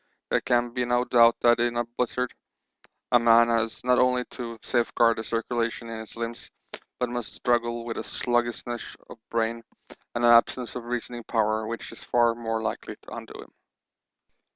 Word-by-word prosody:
There - - +3
can 120 -1 +1
be 125 0 0
no 120 0 +1
doubt 115 -2 +6
that 120 0 +5
in 120 0 +1
a 120 - +2
blizzard 125 +1 -2 0.8
a 120 - +6
man 115 0 +6
has 115 -1 0
not 125 0 +3
only 125 0 +3
to 115 -2 -6
safeguard 115 -1 +2
the - - -3
circulation 115 +1 -2
in 115 -1 -5
his 110 - -10
limbs, 115 0 -5 0.5
but 125 - +1
must 120 -2 -5
struggle 120 -1 0
with 115 - -4
a - - -3
sluggishness 120 -1 -2 0.2
of - - -11
brain 115 0 -1 0.5
and 120 0 +1
an 120 - +7
absence 120 +1 +4
of 125 -2 -5
reasoning 120 0 -4
power 110 -1 0
which 115 +1 -6
is - - -12
far 120 -1 +3
more 115 -1 -3
likely 110 -1 -4
to - - -13
undo - - -8
him. - - -15
120 Hz, 175 wpm, -26 LUFS, 115-120 Hz, 0.8 s, an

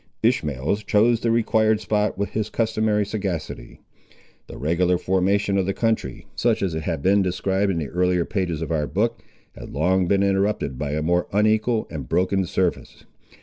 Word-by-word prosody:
Ishmael 75 - +1
chose 110 +2 +2
the 115 - -1
required 110 -1 +2
spot 105 -2 0
with 100 0 -2
his 110 -1 -2
customary 110 -2 0
sagacity. 95 - -5 0.7
The - - -9
regular 85 +5 +1
formation 100 +2 +1
of 95 - -1
the 95 - -1
country, 110 - -1
such - - +1
as 95 -4 -1
it 80 - -3
has 80 -1 -3
been 100 +4 +3
described 95 +2 0
in 90 - -2
the 75 -4 -3
earlier 90 -1 +1
pages 85 -5 -2
of 80 - -5
our 75 -2 0
book, 115 +4 -1 0.3
had - - -10
long 90 +4 +1
been 100 +1 +2
interrupted 100 -8 0
by 75 -1 -2
a 75 0 -1
more 90 +2 +1
unequal 110 +2 +1
and 70 -6 -6
broken 95 +1 +1
surface. 90 0 -2
95 Hz, 175 wpm, -23 LUFS, 85-105 Hz, 0.7 s, been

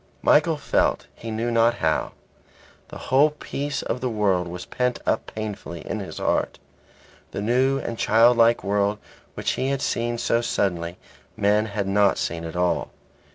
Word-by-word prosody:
Michael - - +4
felt - - +1
he 115 - -8
knew 115 +2 -2
not 115 0 +3
how. 80 -6 0 0.7
The - - -9
whole 140 +4 +3
peace 145 -1 -4
of 125 - -3
the 130 - 0
world 100 -5 +1
was 90 +1 -7
pent 125 -1 -1
up - - 0
painfully 105 -6 -6
in - - -3
his - - -7
heart. - - 0 0.7
The - - -5
new 130 +4 +2
and 115 -4 -5
childlike 115 0 +4
world 100 +1 +1 0.4
which - - -1
he 130 - -1
had 140 0 -1
seen 120 0 -1
so 115 0 +1
suddenly, 90 -7 -1 0.4
men 105 +2 +2
had 100 -2 -3
not 100 0 +3
seen 85 0 -3
at 80 - -7
all. 90 0 0
110 Hz, 160 wpm, -24 LUFS, 100-120 Hz, 0.7 s, Michael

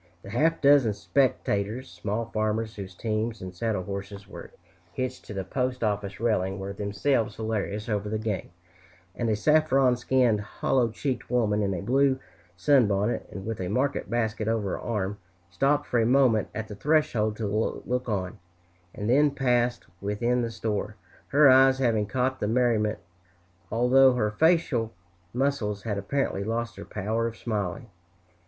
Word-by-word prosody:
The 100 - -9
half 160 +8 +1
dozen 140 -6 +5
spectators, 115 0 0
small 105 +3 -3
farmers 110 0 -2
whose 95 -3 -8
teams 110 +2 -2
and 95 0 -7
saddle 105 0 -2
horses 100 +1 -7
were - - -10 0.4
hitched 130 0 -4
to - - -8
the 95 - -2
postoffice 105 -4 -2
railing, 95 -4 0
were 95 0 -5
themselves 105 +3 0
hilarious 105 -1 -3
over 105 -2 -1
the 110 - -1
game; 110 -3 -3 0.7
and 120 -2 -1
a 110 - +2
saffron 135 0 +3
skinned, 120 -3 +2
hollow 120 +3 0
cheeked 125 +2 -3
woman 110 -4 +1
in 100 -2 0
a 90 - -5
blue 135 +4 +3 0.4
sunbonnet, 105 -1 +2
and 95 -1 -8
with 110 -3 -4
a 90 - -2
market 130 +8 -1
basket 110 -2 -1
over 110 -3 0
her - - -3
arm, 105 -3 -3 0.3
stopped 145 +9 +1
for 120 - 0
a - - +2
moment 125 -5 +3
at 110 0 -4
the 105 - -8
threshold 110 -4 +1
to 110 - -3
look 115 +4 -2
on, 100 0 -3 0.6
and 105 - -4
then 145 +5 +4
passed 125 -3 0 0.2
within 120 +5 0
the 115 - -1
store, 105 -2 -3 0.3
her 145 +1 +5
eyes 130 0 +6
having 115 -5 +1
caught 130 +3 -1
the 105 - -1
merriment, 115 -2 +1 0.7
although 125 +3 +5
her 105 -4 0
facial 145 -4 +2 0.4
muscles 120 -6 -1
had 105 -3 -2
apparently 100 -1 -1
lost 115 +2 -3
their - - -9
power 110 +3 -2
of 115 -1 -7
smiling. 105 -1 -3
115 Hz, 160 wpm, -27 LUFS, 105-125 Hz, 0.7 s, eyes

